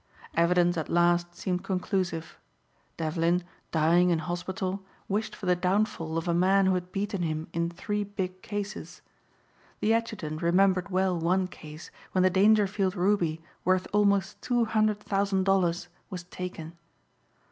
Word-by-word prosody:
Evidence 175 +1 +3
at 160 - -3
last 175 0 +2
seemed 180 -1 -2
conclusive. 180 -3 -2 0.6
Devlin, 165 +2 +1 0.3
dying 170 +3 +3
in 170 - +3
hospital 185 +3 -3 0.2
wished 210 +3 -2
for 200 - -8
the 180 0 +3
downfall 180 -3 0
of 165 - -3
a 170 - +2
man 190 +3 +4
who 190 - +3
had 180 0 -3
beaten 200 -1 -2
him 155 -1 -2
in 170 0 0
three 205 +4 -3
big 185 -2 -5
cases. 205 0 -6 0.8
The 220 - +2
adjutant 210 -9 -2
remembered 185 +2 +3
well 185 -2 +1
one 185 +3 +1
case 155 -2 -11 0.2
when 185 - +3
the 185 - +4
Dangerfield 200 0 +3
ruby 175 -4 +1 0.2
worth 185 +1 +2
almost 205 0 +2
two 240 -2 +1
hundred 215 -1 +1
thousand 195 -1 0
dollars 180 -3 +1 0.2
was 180 -3 -6
taken. 175 -2 -7
185 Hz, 145 wpm, -28 LUFS, 170-195 Hz, 0.8 s, man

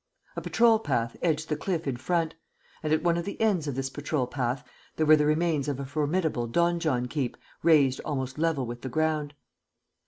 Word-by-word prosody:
A - - -3
patrol 230 -1 +4
path 120 - -1
edged 160 -2 0
the 150 - 0
cliff 165 +1 -2
in 135 -3 -1
front; 165 +5 0 0.5
and, 155 - -2
at 155 0 +2
one 170 -1 +3
of 170 - -1
the 200 - -6
ends 195 -9 +2
of 140 - -2
this 135 0 -2
patrol 145 -2 -1
path, 125 0 -3 0.3
there 155 - +1
were 155 +1 +8
the 150 -1 +2
remains 155 -2 +1
of 140 -2 -2
a 140 - -4
formidable 150 -2 0
donjon 160 -3 +1
keep 130 -1 -2 0.2
razed 145 -5 +4
almost 130 -2 -3
level 160 -5 +1
with 120 0 -6
the 130 - -5
ground. 155 0 0
150 Hz, 195 wpm, -27 LUFS, 135-165 Hz, 0.5 s, were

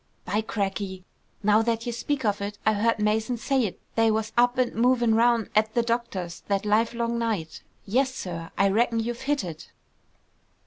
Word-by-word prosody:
"By 210 - 0
crackey! 195 -3 -3 0.4
Now 210 +2 +5
that 230 0 -1
you 240 - -2
speak 265 +2 -2
of 205 -1 +1
it, 205 +1 -4
I 220 - +4
heard 225 +3 +2
Mason 220 +3 0
say't 245 -5 0
they 225 0 +3
was 220 0 0
up 245 +1 +3
an' 255 -1 +1
movin' 240 0 +3
round 230 0 +3
at 215 +1 +2
the 235 - +3
doctor's 230 -7 -2
that 200 0 0
livelong 235 +2 +1
night! 210 -9 -2 0.2
Yes, 260 +6 +1
sir, 170 -9 -6
I 195 0 +4
reckon 230 +3 +2
you've 235 +2 -3
hit 280 -1 0
it!" 165 -3 -8
225 Hz, 175 wpm, -26 LUFS, 205-235 Hz, 0.4 s, Now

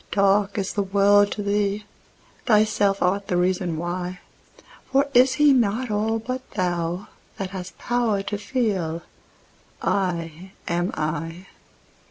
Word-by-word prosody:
Dark 200 0 +2
is 195 -1 -2
the 205 - 0
world 200 +1 +4
to 210 - -4
thee: 205 0 0 0.6
thyself 210 -3 +3
art 195 +2 +1
the 180 - 0
reason 180 -2 0
why; 180 +2 -4 0.7
For 275 +1 +4
is 255 +1 +6
He 295 0 +5
not 235 0 +1
all 220 +2 +1
but 255 +3 -4
thou, 175 -1 -1 0.3
that 190 -2 -4
hast 180 -3 -7
power 235 -5 0
to 205 +1 -3
feel 195 -9 -1 0.8
'I 180 -1 -2
am 175 +2 0
I'? 165 +3 -3
200 Hz, 130 wpm, -24 LUFS, 180-210 Hz, 0.8 s, is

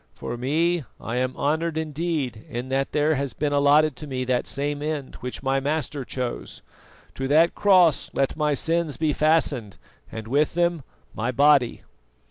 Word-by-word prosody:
For 120 - -5
me, 160 +7 0 0.2
I 115 +2 -4
am 130 0 -1
honoured 160 +2 0
indeed 155 -7 -2
in 120 +2 -5
that 135 +1 0
there 150 +1 +2
has 140 -4 -2
been 145 +2 -1
allotted 145 +1 +4
to 150 - -8
me 130 -2 -3
that 125 -1 0
same 145 +1 -2
end 150 -3 -3
which 125 +2 -6
my 135 0 +1
Master 145 0 -2
chose. 125 - -5 0.5
To 135 - -3
that 160 +4 +4
cross 185 -7 +4
let 135 -1 0
my 150 -2 +1
sins 165 -2 -1
be 155 -2 +1
fastened 145 -9 +1 0.3
and 110 -1 -7
with 145 +6 +1
them 170 -2 +1 0.3
my 115 +3 -2
body." 140 -1 +3
145 Hz, 165 wpm, -24 LUFS, 130-155 Hz, 0.5 s, allotted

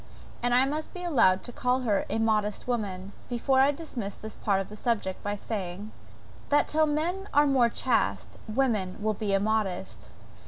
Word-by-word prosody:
And 245 0 +2
I 255 +2 +5
must 305 +5 -4
be 360 - -6
allowed 230 - +3
to - - -4
call 250 +2 0
her 210 -5 0
a - - -1
modest 215 -1 0
woman, 200 -6 -3 0.2
before 265 +2 +2
I 270 +1 +6
dismiss 265 -9 -4
this 220 0 -9
part 200 -2 +1
of 195 - -3
the 210 - -9
subject, 210 -5 -1
by 205 0 -2
saying, 200 -1 -5 0.6
that 290 - +3
till 310 0 +2
men 345 +7 -1
are 290 +1 +6
more 260 -4 +4
chaste, 100 - 0
women 215 -6 0
will 215 0 +2
be 210 0 -2
immodest. 200 -1 -1
225 Hz, 180 wpm, -28 LUFS, 200-270 Hz, 0.6 s, I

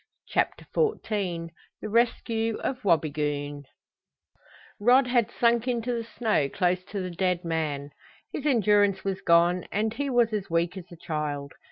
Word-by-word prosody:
CHAPTER - - 0
XIV 195 - -1 0.3
THE - - -5
RESCUE 225 0 +1
OF 255 -2 -3
WABIGOON 145 -4 0 1.1
Rod 250 +5 +5
had 240 -3 +2
sunk 235 0 +3
into 245 0 -1
the 230 -1 -2
snow 210 - +1
close 180 +2 0
to 200 0 -4
the 185 -1 -4
dead 180 0 -1
man. 150 -4 -2 0.4
His 295 - -2
endurance 205 -6 +3
was 195 -1 -2
gone 170 +1 +3
and 215 +2 0
he 285 +2 -2
was 240 -3 +3
as 205 -2 -2
weak 170 +2 0
as 185 -3 -7
a 170 - -11
child. 150 -3 -4
195 Hz, 150 wpm, -27 LUFS, 165-230 Hz, 1.1 s, Rod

